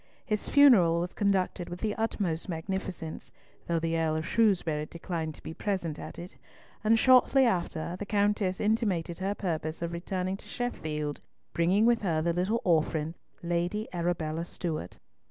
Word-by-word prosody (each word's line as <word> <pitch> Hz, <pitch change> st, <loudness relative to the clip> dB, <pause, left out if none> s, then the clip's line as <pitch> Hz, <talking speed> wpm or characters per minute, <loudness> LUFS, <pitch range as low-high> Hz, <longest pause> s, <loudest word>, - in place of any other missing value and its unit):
His 215 Hz, -2 st, -2 dB
funeral 215 Hz, -, +6 dB
was 175 Hz, +1 st, -3 dB
conducted 190 Hz, -3 st, 0 dB
with 175 Hz, 0 st, -6 dB
the 215 Hz, -2 st, -1 dB
utmost 195 Hz, -7 st, -2 dB
magnificence, 175 Hz, -1 st, -5 dB, 0.4 s
though 170 Hz, -, +1 dB
the 165 Hz, 0 st, 0 dB
Earl 160 Hz, -1 st, +1 dB
of 160 Hz, +1 st, -2 dB
Shrewsbury 170 Hz, -10 st, +2 dB
declined 165 Hz, -2 st, -4 dB
to -, -, -16 dB
be 160 Hz, -, -6 dB
present 175 Hz, -5 st, -2 dB
at -, -, -8 dB
it, 175 Hz, +2 st, -9 dB, 0.5 s
and 220 Hz, +1 st, +5 dB
shortly 260 Hz, +2 st, +5 dB
after, 175 Hz, -5 st, -1 dB
the 205 Hz, -, -5 dB
Countess 205 Hz, -2 st, +1 dB
intimated 200 Hz, -6 st, 0 dB
her 195 Hz, +2 st, -1 dB
purpose 160 Hz, -5 st, -3 dB
of 170 Hz, 0 st, -3 dB
returning 185 Hz, +2 st, -2 dB
to -, -, -15 dB
Sheffield, 150 Hz, -11 st, -3 dB, 0.3 s
bringing 185 Hz, +6 st, +3 dB
with 235 Hz, -1 st, +4 dB
her 170 Hz, -6 st, +1 dB
the 170 Hz, +2 st, +1 dB
little 190 Hz, +7 st, 0 dB
orphan, 160 Hz, -2 st, +1 dB, 0.3 s
Lady 175 Hz, +5 st, -1 dB
Arabella 170 Hz, -2 st, -1 dB
Stewart. 165 Hz, -, -5 dB
175 Hz, 155 wpm, -29 LUFS, 165-205 Hz, 0.5 s, funeral